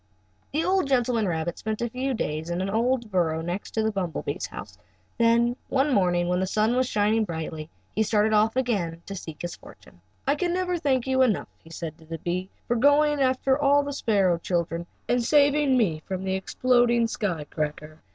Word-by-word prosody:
The 315 +3 0
old 375 -4 +2
gentleman 245 -5 +1
rabbit 165 0 -2
spent 215 0 -3
a 235 - -1
few 255 +3 -2
days 155 -4 -3
in 175 +1 -2
an 190 +1 -2
old 235 +1 0
burrow 165 -4 +1
next 175 +4 -4
to 220 - +1
the 220 - +1
bumble 185 -5 -3
bee's - - -3
house, - - -9 0.4
and 230 - +5 0.2
then 240 - -4
one 270 +1 +2
morning, 175 -3 +2
when 180 0 +1
the 190 - 0
sun 215 +4 +1
was 255 0 +2
shining 215 +1 +2
brightly, 160 -3 -5 0.2
he 220 - 0
started 215 0 +2
off 215 +2 +3
again 190 -10 -1
to 200 - -6
seek 160 -5 -8
his 175 -1 -4
fortune. 85 - -17 0.2
"I 275 - +3
never 360 0 0
can 345 - -2
thank 260 -4 +1
you 265 0 +2
enough," 240 -7 +2
he 160 - -15
said 165 -1 -7
to 160 - -16
the 165 +1 -6
bee, 180 +3 -3 0.2
"for 240 - +1
going 290 +3 +4
after 265 +1 +2
the 285 0 +3
sparrow 195 -10 +2
children 170 -1 -2 0.2
and 245 0 +1
saving 285 0 +4
me 170 -10 +1
from 190 -1 -3
the 190 0 -1
exploding 240 +4 +2
sky 200 -8 -2
cracker. 150 +1 -5
215 Hz, 200 wpm, -26 LUFS, 175-260 Hz, 0.4 s, and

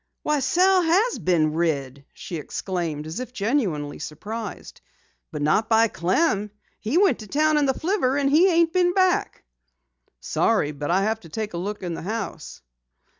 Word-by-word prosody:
"Why 300 -1 +1
Sal 365 +7 +3
has 380 +8 +2
been 155 -4 +1
rid!" 140 -5 -2
she 175 - -7
exclaimed 160 -1 -4
as 160 +8 -5
if 255 0 -7
genuinely 195 - -1
surprised. 215 +10 -7 0.5
"But 150 -3 -4
not 210 +10 +2
by 225 0 +4
Clem. 205 - 0 0.3
He 230 +9 -1
went 390 0 +3
to 215 - -9
town 305 +6 +2
in 290 -2 +2
the 265 - +1
flivver, 320 -7 0
and 280 -1 +1
he 310 +7 +5
ain't 335 -1 +2
been 355 -1 +2
back." 370 -2 +1 0.8
"Sorry, 145 - +1
but 145 0 -5
I'll 190 +3 +2
have 220 +2 0
to 170 - -14
take 215 +4 -4
a - - -4
look 205 +3 -5
in 175 -2 -3
the - - -6
house." 210 - -6
220 Hz, 175 wpm, -24 LUFS, -, 0.8 s, he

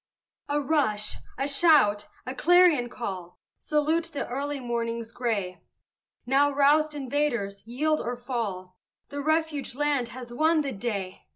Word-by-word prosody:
A 290 +1 +1
rush 265 -8 0 0.2
a 270 +2 -1
shout 275 -9 +4 0.2
a 255 - -4
clarion 330 -4 +4
call, 185 -8 -6 0.2
Salute 310 +2 +1
the 285 - -5
early 280 +3 -3
morning's 235 -2 -3
gray: 200 -8 -2 0.6
Now, 275 +3 +4
roused 295 +2 +3
invaders, 255 -8 -1
yield 305 +6 0
or 245 +1 -3
fall: 210 -7 -5 0.3
The 285 0 -4
refuge 315 -3 -1
land 285 -4 0
has 245 -1 -9
won 315 +4 +3
the 280 -2 -3
day! 195 -4 -5
260 Hz, 130 wpm, -27 LUFS, 230-295 Hz, 0.6 s, shout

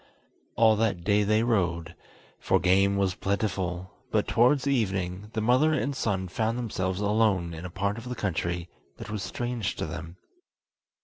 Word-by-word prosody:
All 110 -1 +5
that 105 -6 0
day 100 +3 +3
they 110 +2 +2
rode, 85 -8 0 0.5
for - - +2
game 95 +3 +3
was 95 -2 +1
plentiful, 95 -3 -2 0.2
but - - +1
towards 125 +4 +3
evening 100 -7 -1
the 110 - -1
mother 130 +8 +3
and 140 -2 -1
son 95 -7 -1
found 110 +5 -1
themselves 95 -6 -2
alone 105 -5 +2
in 80 +2 -7
a - - -5
part 100 +5 -2
of 120 +2 -9
the 125 - -3
country 90 -4 -2 0.3
that - - -8
was 105 -2 -3
strange 120 +1 -3
to - - -3
them. 85 +1 -7
100 Hz, 165 wpm, -27 LUFS, 90-115 Hz, 0.5 s, All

